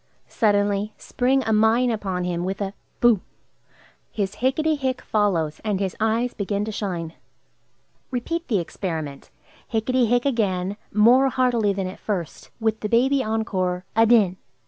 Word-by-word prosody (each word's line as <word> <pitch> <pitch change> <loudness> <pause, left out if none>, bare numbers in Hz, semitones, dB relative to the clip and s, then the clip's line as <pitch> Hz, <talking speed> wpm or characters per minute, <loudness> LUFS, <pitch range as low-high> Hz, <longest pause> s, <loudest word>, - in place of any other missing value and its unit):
Suddenly 205 -1 +1
spring 260 +2 0
a 220 - 0
mine 225 +3 +3
upon 190 -5 -2
him 175 -1 -2
with 190 +1 -3
a 200 -1 -3 0.3
"Boo!" 235 -6 +5 0.9
His 200 -3 -3
"Hicketty 305 +5 +1
hick!" 260 -3 -2
follows, 170 -8 0
and 210 -3 -1
his 195 -2 -2
eyes 225 +3 +1
begin 200 0 -2
to 220 - -4
shine. 175 -6 -4 1.0
Repeat 330 +7 -3
the 220 - +1
experiment. 160 -5 -4 0.4
"Hicketty 240 +2 +1
hick!" 245 +2 +2
again, 200 -7 0 0.2
more 245 +6 +5
heartily 245 -5 +2
than 195 -1 -2
at 185 - -7
first, 180 -7 -4
with 220 -1 0
the 210 - -3
baby 265 +4 +3
encore, 185 -5 -1
"Adin!" 225 -5 +4
215 Hz, 145 wpm, -23 LUFS, 190-240 Hz, 1.0 s, Boo